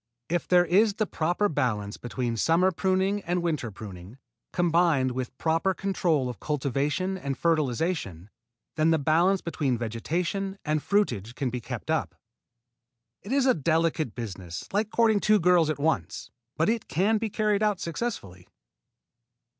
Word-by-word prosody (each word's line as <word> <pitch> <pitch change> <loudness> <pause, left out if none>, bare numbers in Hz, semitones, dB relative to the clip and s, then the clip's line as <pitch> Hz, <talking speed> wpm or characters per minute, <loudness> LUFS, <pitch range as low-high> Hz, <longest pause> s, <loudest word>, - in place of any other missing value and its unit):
If 175 0 -1
there 180 -1 +5
is 200 +4 +3
the 215 - 0
proper 175 +4 0
balance 115 - -1
between 120 -1 -3
summer 170 +9 +3
pruning 190 +3 0
and 175 -1 -1
winter 155 -8 -1
pruning, 100 +1 -10 0.3
combined 165 -6 +2
with 130 0 -5
proper 165 +4 +1
control 175 -8 0
of 125 -5 -6
cultivation 150 +6 -1
and 140 -4 -3
fertilization, 150 - -1 0.5
then 155 +1 +3
the 165 - +4
balance 170 +6 +2
between 145 -7 -1
vegetation 170 - -2
and 155 0 0
fruitage 120 - 0
can 135 -4 -2
be 125 0 -4
kept - - -5
up. - - -1 1.1
It 205 - -8
is 275 -1 +3
a 260 - +5
delicate 160 -3 0
business, 95 -7 -6
like 210 +1 +1
courting 225 -2 +3
two 215 +1 +4
girls 175 -2 +4
at 155 - -1
once, 160 +3 -2 0.3
but 160 - +2
it 230 0 0
can 210 +6 +1
be 225 0 -2
carried 210 0 +1
out 210 -3 +1
successfully. 150 - -5
165 Hz, 150 wpm, -27 LUFS, 130-190 Hz, 1.1 s, there